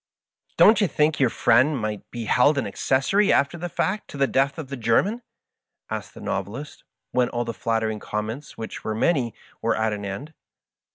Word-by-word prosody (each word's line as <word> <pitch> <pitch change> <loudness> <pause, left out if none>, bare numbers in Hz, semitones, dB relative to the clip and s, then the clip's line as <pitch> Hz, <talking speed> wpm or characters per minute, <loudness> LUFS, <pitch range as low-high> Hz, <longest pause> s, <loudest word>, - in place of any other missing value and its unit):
" - - -43
Don't 220 +1 +7
yon 200 - +2
think 150 +1 +2
yonr 130 -3 +3
friend 130 +6 +3
might 110 -3 -4
be 120 -2 -5
held 140 +6 +4
an 140 - 0
accessory 165 +11 +2
after 140 +4 +2
the 175 +1 -5
fact 195 +5 -1
to - - -9
the 140 - +3
death 135 +1 +1
of 155 -5 -6
the 140 - -4
German? 135 - +1 0.4
" - - -62
asked - - -5
the - - -10
Novelist, 110 +10 -5 0.3
when 125 -1 +2
all 120 0 -2
the 115 - -3
flattering 110 -1 -1
comments, 110 +8 -5
which 110 - -7
were 110 - -2
many, 120 -3 +1 0.3
were 115 - +1
at 110 -1 +1
an 105 -1 -5
end. 115 +11 -6
125 Hz, 195 wpm, -24 LUFS, 110-150 Hz, 0.4 s, Don't